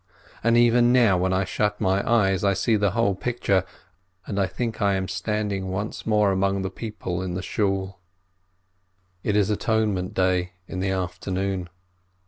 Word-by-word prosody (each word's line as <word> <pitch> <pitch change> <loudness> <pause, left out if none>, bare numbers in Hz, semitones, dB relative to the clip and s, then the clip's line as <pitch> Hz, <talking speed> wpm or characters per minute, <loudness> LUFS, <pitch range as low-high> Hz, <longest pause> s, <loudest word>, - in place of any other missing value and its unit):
And 115 +1 +4
even 120 0 +5
now, 120 -6 +5
when 95 +1 +1
I 95 +1 +1
shut 105 +1 -1
my 95 +1 +2
eyes, 95 -5 +3
I 100 -1 +3
see 110 +4 +2
the 105 -1 +2
whole 115 -4 +2
picture, 100 -3 0 0.6
and 100 - -3
I 95 - +2
think 115 -3 -4
I 100 -1 +3
am 95 0 -2
standing 95 +1 -2
once 105 +5 -4
more 105 -2 +3
among 95 0 0
the 95 - -3
people 105 -5 -5
in 90 -1 -4
the 90 - -4
Shool. 95 -2 -1 1.2
It 105 - -1
is 105 0 +2
Atonement 105 -3 0
Day 90 -1 +1
in 95 - -5
the 95 +1 0
afternoon. 95 0 -2
100 Hz, 165 wpm, -24 LUFS, 95-105 Hz, 1.2 s, even